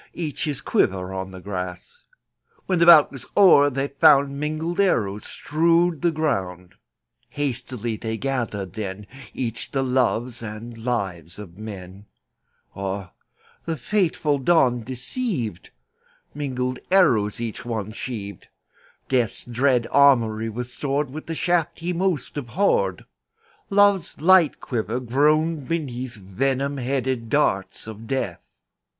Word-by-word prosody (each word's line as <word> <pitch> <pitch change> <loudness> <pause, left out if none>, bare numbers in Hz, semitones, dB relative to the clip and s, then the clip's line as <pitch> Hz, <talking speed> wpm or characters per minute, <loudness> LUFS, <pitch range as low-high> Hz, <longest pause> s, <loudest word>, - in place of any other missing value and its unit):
— - - -35
Each 145 - -3
his 145 -2 -3
quiver 95 - 0
on 95 0 -4
the 95 -1 -10
grass. 90 - -6 0.6
When 185 -3 0
the 170 - +4
bout 160 -4 +8
was 135 -3 -8
o'er 170 -8 +7
they 135 +1 -2
found 140 0 +4
Mingled 155 +4 -2
arrows 105 - +1
strewed 165 +1 +1
the 175 - +3
ground. 95 - -2 0.6
Hastily 120 -5 -3
they 110 +1 -4
gathered 115 -8 -3
then 105 -1 -5 0.3
Each 120 -3 -4
the 135 -1 -1
loves 125 -2 0
and 110 +2 -7
lives 95 -8 -3
of 100 -5 -10
men. 100 -2 -9 0.7
Ah, 95 -1 -4 0.5
the 165 -1 -2
fateful 155 - 0
dawn 130 -5 +3
deceived! 125 - -3 0.6
Mingled 130 -3 -3
arrows 115 - +3
each 115 -2 -5
one 110 -4 -4
sheaved; 105 -5 -7 0.6
Death's 125 -5 0
dread 125 0 +1
armoury 115 -6 +4
was 125 +2 -6
stored 140 -1 -2
With 155 +3 -8
the 165 - -3
shafts 170 -1 0
he 175 +2 -2
most 175 -6 -1
abhorred; 120 - 0 0.6
Love's 200 -3 +3
light 175 0 +5
quiver 115 -1 -2
groaned 150 +4 +1
beneath 130 -7 -3
Venom 135 +8 -2
headed 130 -2 -2
darts 100 -10 0
of 110 0 -9
Death. 110 -10 -2
125 Hz, 125 wpm, -23 LUFS, 110-150 Hz, 0.7 s, bout